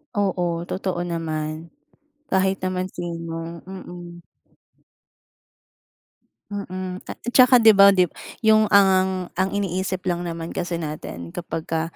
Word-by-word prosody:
Oo, 180 -4 0
totoo 185 0 -3
naman. 160 -2 -4 0.6
Kahit 190 0 +1
naman 185 0 -3
sino, 165 -1 -6
mm. 175 -2 -10 2.3
Mm, 185 -2 -5
ta - - -9 0.2
tsaka 255 -1 +8
'di 225 -2 +7
ba, 200 0 +8
dib 185 -4 +2 0.3
yung 215 -1 +5
ang, 190 -2 +3
ang 190 +1 0
iniisip 190 -2 -2
lang 175 -1 -1
naman 165 -1 -5
kasi 175 -1 -2
natin 150 - -6
kapag 165 -2 -5
ka, 160 0 -1
180 Hz, 115 wpm, -23 LUFS, 170-190 Hz, 2.3 s, tsaka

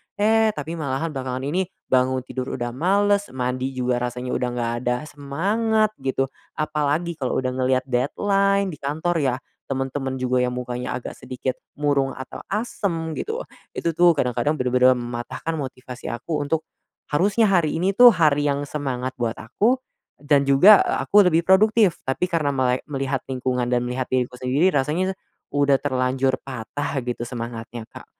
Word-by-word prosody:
Eh, 220 +1 +3
tapi 150 +2 -5
malahan 150 +2 -2
belakangan 130 -2 -4
ini 175 +6 -1 0.2
bangun 130 0 +2
tidur 130 0 -4
udah 120 -1 -3
males, 200 +8 +2
mandi 130 +1 -2
juga 125 -1 0
rasanya 125 +1 -3
udah 125 - 0
nggak 120 -1 -1 0.2
ada 125 - +3 0.2
semangat 205 +10 0
gitu, 135 0 -1 0.2
apalagi 155 +2 -1
kalau 130 -2 -1
udah 130 -1 -1
ngeliat 130 0 +1
deadline 195 +10 +1
di 150 - -9
kantor 160 +5 -1
ya, 135 -4 +1 0.4
temen-temen 135 0 -2
juga 125 0 +1
yang 125 - 0
mukanya 125 0 -4
agak - - -8
sedikit 130 0 -4 0.2
murung 140 -2 +1
atau 130 0 -8
asem 185 -7 -2
gitu. 450 +2 -3 0.3
Itu 165 -2 -2
tuh 175 +1 +6
kadang-kadang 130 +1 0
bener-bener 125 0 +4
mematahkan 120 +6 -4
motivasi 130 -3 -6
aku 145 +6 -3
untuk 160 +2 -2 0.4
harusnya 200 +8 +3
hari 165 -5 +2
ini 190 +3 +1
tuh 245 +2 +9
hari 150 -6 +3
yang 140 0 -1
semangat 130 -3 -3
buat 115 -2 -1
aku 245 +5 +1 0.4
dan 145 -1 +3
juga, 180 +10 +7
eee, - - 0
aku 205 0 +7
lebih 165 - +4
produktif, 205 0 +5
tapi 135 +7 0
karena 160 -5 +1
melek 130 -1 +1
melihat 135 -2 -2
lingkungan 125 -1 -1
dan 125 - +3
melihat 125 +1 -2
diriku 125 -1 0
sendiri 135 +9 +2
rasanya 180 +8 0 0.4
udah 140 -1 +4
terlanjur 130 -1 +1
patah 135 +3 -4
gitu 120 -1 -4
semangatnya, 115 -1 -6
Kak. - - -12
135 Hz, 155 wpm, -23 LUFS, 125-170 Hz, 0.4 s, tuh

